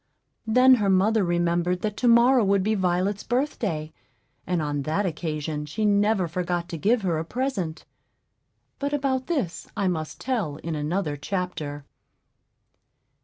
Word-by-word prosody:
Then 255 Hz, +4 st, +6 dB
her 200 Hz, -, +2 dB
mother 200 Hz, +3 st, +3 dB
remembered 175 Hz, 0 st, 0 dB
that 210 Hz, -1 st, -2 dB
to 250 Hz, -, +1 dB
morrow 240 Hz, +1 st, +6 dB
would 195 Hz, -1 st, +2 dB
be 215 Hz, +2 st, +1 dB
Violet's 185 Hz, +1 st, 0 dB
birthday, 210 Hz, -, -2 dB, 0.5 s
and 180 Hz, -1 st, 0 dB
on 145 Hz, -2 st, -1 dB
that 160 Hz, +8 st, -1 dB
occasion 155 Hz, -3 st, -3 dB
she 210 Hz, +9 st, -2 dB
never 205 Hz, -2 st, +3 dB
forgot 175 Hz, +1 st, -2 dB
to 165 Hz, -, -4 dB
give 220 Hz, +5 st, +2 dB
her 170 Hz, -4 st, 0 dB
a -, -, -2 dB
present. 190 Hz, -5 st, -3 dB, 0.9 s
But 285 Hz, +1 st, -2 dB
about 265 Hz, -2 st, 0 dB
this 270 Hz, -, -2 dB
I 200 Hz, -2 st, +1 dB
must 160 Hz, -4 st, -3 dB
tell 220 Hz, -, -2 dB
in 160 Hz, +2 st, -5 dB
another 150 Hz, +1 st, -2 dB
chapter. 155 Hz, -4 st, -4 dB
185 Hz, 145 wpm, -25 LUFS, 160-220 Hz, 0.9 s, Then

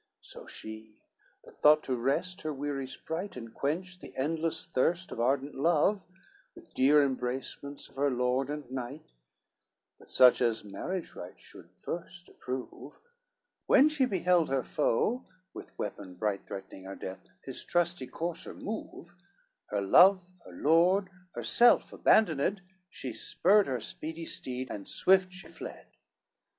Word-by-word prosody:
CX -, -, -27 dB
So -, -, -11 dB
she, 110 Hz, 0 st, -9 dB, 0.5 s
that -, -, -18 dB
thought 150 Hz, +1 st, +6 dB
to 130 Hz, -, -1 dB
rest 140 Hz, +9 st, -1 dB
her 155 Hz, -, -3 dB
weary 140 Hz, -1 st, -3 dB
sprite, 165 Hz, +6 st, -5 dB
And 115 Hz, -2 st, -9 dB
quench 180 Hz, +6 st, -3 dB
the -, -, -12 dB
endless 160 Hz, +3 st, -1 dB
thirst 170 Hz, +8 st, 0 dB
of -, -, -6 dB
ardent 135 Hz, +4 st, +1 dB
love 170 Hz, +7 st, +2 dB, 0.5 s
With 345 Hz, -1 st, -16 dB
dear 145 Hz, +3 st, +5 dB
embracements 135 Hz, +2 st, -4 dB
of -, -, -21 dB
her 140 Hz, +1 st, +2 dB
lord 125 Hz, +1 st, 0 dB
and 150 Hz, -2 st, -5 dB
knight, 130 Hz, -, -6 dB, 0.9 s
But -, -, -18 dB
such 125 Hz, 0 st, +6 dB
as 115 Hz, -2 st, +1 dB
marriage 160 Hz, -, -5 dB
rites 90 Hz, +1 st, -10 dB
should -, -, -14 dB
first 175 Hz, 0 st, -7 dB
approve, 130 Hz, 0 st, -7 dB, 0.7 s
When 290 Hz, +3 st, +6 dB
she 300 Hz, -4 st, +2 dB
beheld 180 Hz, -5 st, +2 dB
her 135 Hz, -1 st, 0 dB
foe, 240 Hz, -, 0 dB, 0.3 s
with -, -, -11 dB
weapon 90 Hz, -1 st, -6 dB
bright 100 Hz, +1 st, -2 dB
Threatening 95 Hz, -1 st, -8 dB
her 95 Hz, 0 st, -7 dB
death, 95 Hz, 0 st, -8 dB, 0.2 s
his 130 Hz, -, -5 dB
trusty 175 Hz, -5 st, 0 dB
courser 165 Hz, +3 st, -5 dB
move, 205 Hz, -5 st, -7 dB, 0.5 s
Her 100 Hz, -, -1 dB
love, 180 Hz, -, +6 dB
her -, -, -11 dB
lord, 180 Hz, +5 st, +3 dB, 0.2 s
herself 240 Hz, +1 st, +4 dB
abandoned, 195 Hz, 0 st, +3 dB, 0.3 s
She 130 Hz, -9 st, -6 dB
spurred 200 Hz, -, +3 dB
her 130 Hz, -2 st, -1 dB
speedy 160 Hz, +1 st, -6 dB
steed, 130 Hz, -4 st, -5 dB
and 100 Hz, -, -6 dB
swift 190 Hz, -1 st, +4 dB
she 185 Hz, +1 st, -10 dB
fled. -, -, -9 dB
150 Hz, 145 wpm, -30 LUFS, 125-180 Hz, 0.9 s, thought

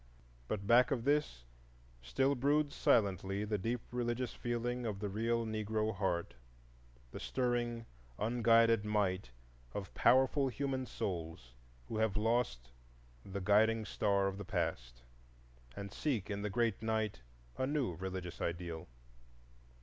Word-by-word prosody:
But 100 Hz, -2 st, -3 dB
back 120 Hz, +3 st, +6 dB
of 125 Hz, -4 st, -1 dB
this 145 Hz, -, +1 dB, 0.6 s
still 135 Hz, -, +1 dB
broods 145 Hz, +2 st, +2 dB
silently 100 Hz, -1 st, +2 dB
the 105 Hz, -1 st, -1 dB
deep 115 Hz, +4 st, -1 dB
religious 120 Hz, 0 st, -1 dB
feeling 120 Hz, +1 st, -2 dB
of 110 Hz, -4 st, -2 dB
the 100 Hz, 0 st, -3 dB
real 115 Hz, +3 st, 0 dB
Negro 110 Hz, 0 st, -1 dB
heart, 85 Hz, -7 st, -1 dB, 0.8 s
the -, -, -7 dB
stirring, 120 Hz, -2 st, -1 dB, 0.3 s
unguided 115 Hz, -1 st, +4 dB
might 100 Hz, -, 0 dB, 0.5 s
of 95 Hz, -2 st, -5 dB
powerful 135 Hz, +2 st, +4 dB
human 130 Hz, +1 st, -2 dB
souls 80 Hz, -, -5 dB, 0.3 s
who 110 Hz, -, -4 dB
have 110 Hz, -2 st, +1 dB
lost 105 Hz, -, 0 dB, 0.5 s
the 100 Hz, 0 st, -5 dB
guiding 110 Hz, +3 st, +4 dB
star 100 Hz, -2 st, +1 dB
of 95 Hz, 0 st, -2 dB
the -, -, -4 dB
past -, -, -3 dB, 0.7 s
and 100 Hz, -1 st, -6 dB
seek 115 Hz, -9 st, -1 dB
in 100 Hz, 0 st, -2 dB
the 105 Hz, -, -2 dB
great 115 Hz, 0 st, 0 dB
night 110 Hz, -, -1 dB, 0.4 s
a 130 Hz, -, +1 dB
new 140 Hz, -, 0 dB
religious 90 Hz, 0 st, -5 dB
ideal. 85 Hz, -1 st, -3 dB
110 Hz, 130 wpm, -35 LUFS, 95-120 Hz, 0.8 s, back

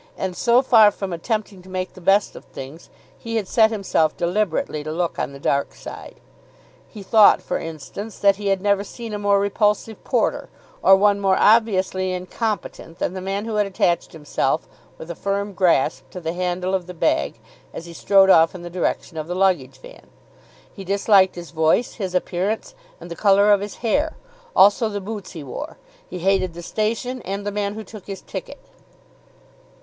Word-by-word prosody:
And, 190 Hz, -2 st, -3 dB
so 240 Hz, +6 st, +3 dB
far 225 Hz, -5 st, +7 dB
from 195 Hz, -2 st, -5 dB
attempting 205 Hz, +2 st, -3 dB
to 185 Hz, -, -16 dB
make 185 Hz, 0 st, -4 dB
the 185 Hz, -, -13 dB
best 195 Hz, +3 st, +2 dB
of -, -, -10 dB
things, 140 Hz, +5 st, -10 dB, 0.3 s
he 230 Hz, 0 st, -5 dB
had 215 Hz, -4 st, -1 dB
set 220 Hz, +1 st, +4 dB
himself 195 Hz, -7 st, 0 dB
deliberately 175 Hz, -4 st, -1 dB
to 155 Hz, -, -5 dB
look 170 Hz, +1 st, -2 dB
on -, -, -2 dB
the 140 Hz, -, -11 dB
dark 140 Hz, 0 st, -1 dB
side. -, -, -10 dB, 0.7 s
He 210 Hz, -3 st, -11 dB
thought, 215 Hz, +1 st, +6 dB
for -, -, -3 dB
instance, 165 Hz, +7 st, -8 dB
that 200 Hz, -1 st, +3 dB
he 205 Hz, -1 st, -4 dB
had 195 Hz, -1 st, +1 dB
never 200 Hz, 0 st, +2 dB
seen 230 Hz, +1 st, -8 dB
a 210 Hz, -, -3 dB
more 200 Hz, -1 st, +3 dB
repulsive 210 Hz, +2 st, 0 dB
porter, -, -, 0 dB, 0.3 s
or 195 Hz, -, +7 dB
one 200 Hz, +1 st, +3 dB
more 195 Hz, -1 st, +2 dB
obviously 190 Hz, -4 st, +3 dB
incompetent 185 Hz, -2 st, -4 dB
than 180 Hz, -, -2 dB
the 190 Hz, -, -5 dB
man 195 Hz, +3 st, -3 dB
who 225 Hz, -2 st, -3 dB
had 210 Hz, -1 st, +2 dB
attached 175 Hz, -3 st, 0 dB
himself 150 Hz, -3 st, -2 dB, 0.3 s
with 160 Hz, -, -8 dB
a -, -, -7 dB
firm 200 Hz, +2 st, -2 dB
grasp 170 Hz, -6 st, +1 dB
to 180 Hz, -, -8 dB
the 165 Hz, -1 st, -3 dB
handle 180 Hz, +1 st, -2 dB
of 185 Hz, -2 st, -1 dB
the 180 Hz, -, -8 dB
bag 70 Hz, -, 0 dB, 0.3 s
as 165 Hz, -, -8 dB
he 170 Hz, -, -10 dB
strode 195 Hz, +2 st, +4 dB
off 165 Hz, +1 st, +5 dB
in 175 Hz, -, -8 dB
the 175 Hz, -, -8 dB
direction 175 Hz, -1 st, -2 dB
of 155 Hz, 0 st, -4 dB
the 180 Hz, -, -4 dB
luggage 175 Hz, -9 st, +1 dB
van. -, -, -14 dB, 0.7 s
He 195 Hz, -, -9 dB
disliked 195 Hz, 0 st, +3 dB
his 175 Hz, -1 st, -9 dB
voice, 160 Hz, +8 st, +1 dB
his 185 Hz, -2 st, -3 dB
appearance, 200 Hz, -, -2 dB, 0.3 s
and -, -, -11 dB
the -, -, -4 dB
colour 200 Hz, +1 st, +4 dB
of 200 Hz, -1 st, +4 dB
his 205 Hz, -1 st, -6 dB
hair. 300 Hz, +7 st, 0 dB, 0.4 s
Also 205 Hz, +3 st, +5 dB
the 205 Hz, -1 st, -4 dB
boots 200 Hz, -1 st, -7 dB
he 160 Hz, -4 st, -7 dB
wore. 290 Hz, -, -7 dB, 0.3 s
He -, -, -6 dB
hated 185 Hz, -1 st, +1 dB
the 175 Hz, -, -8 dB
station, 230 Hz, +6 st, -2 dB
and 200 Hz, +1 st, -5 dB
the 205 Hz, -, -2 dB
man 205 Hz, 0 st, -2 dB
who 220 Hz, -, -6 dB
took 210 Hz, -1 st, -12 dB
his 195 Hz, -1 st, -6 dB
ticket. -, -, -8 dB
195 Hz, 195 wpm, -22 LUFS, 175-210 Hz, 0.7 s, far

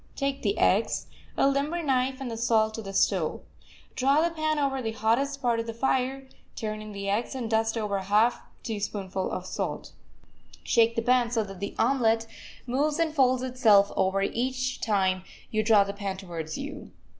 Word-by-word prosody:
Take 275 Hz, 0 st, -2 dB
the 400 Hz, -, 0 dB
eggs, -, -, +2 dB, 0.3 s
a -, -, +4 dB
limber 290 Hz, +5 st, 0 dB
knife 260 Hz, -2 st, +1 dB
and 260 Hz, -3 st, -5 dB
the -, -, -4 dB
salt 225 Hz, -1 st, +2 dB
to 225 Hz, -, -5 dB
the 195 Hz, -2 st, -7 dB
stove. 190 Hz, -4 st, +1 dB, 0.5 s
Draw 275 Hz, +4 st, +3 dB
the 340 Hz, -, -6 dB
pan 310 Hz, -1 st, 0 dB
over 275 Hz, -2 st, 0 dB
the 225 Hz, -2 st, -3 dB
hottest 270 Hz, +6 st, 0 dB
part 235 Hz, -2 st, +2 dB
of 230 Hz, -, -3 dB
the 230 Hz, -, -5 dB
fire, 265 Hz, +2 st, 0 dB, 0.3 s
turn 215 Hz, -1 st, -4 dB
in 215 Hz, 0 st, -8 dB
the 200 Hz, -1 st, -5 dB
eggs, 215 Hz, +7 st, -1 dB
and 250 Hz, -3 st, -3 dB
dust 225 Hz, +1 st, +1 dB
over 210 Hz, -2 st, -1 dB
a 190 Hz, -, -4 dB
half 215 Hz, +4 st, +3 dB, 0.2 s
teaspoonful 200 Hz, -3 st, -3 dB
of 185 Hz, -, -4 dB
salt. -, -, -4 dB, 0.7 s
Shake 230 Hz, 0 st, +3 dB
the 230 Hz, -, 0 dB
pan 245 Hz, -1 st, +3 dB
so 230 Hz, -2 st, 0 dB
that 195 Hz, -2 st, -9 dB
the 200 Hz, -, -5 dB
omelet 225 Hz, -2 st, +2 dB, 0.4 s
moves 290 Hz, +5 st, 0 dB
and 330 Hz, -2 st, 0 dB
folds 255 Hz, -3 st, +3 dB
itself 220 Hz, -6 st, +4 dB
over 195 Hz, +1 st, +1 dB
each 255 Hz, +4 st, -2 dB
time 190 Hz, -3 st, +1 dB, 0.3 s
you 215 Hz, -, +1 dB
draw 215 Hz, -2 st, +5 dB
the 200 Hz, 0 st, -5 dB
pan 200 Hz, -2 st, -4 dB
towards 170 Hz, -5 st, -6 dB
you. 280 Hz, +2 st, -7 dB
230 Hz, 190 wpm, -27 LUFS, 205-265 Hz, 0.7 s, draw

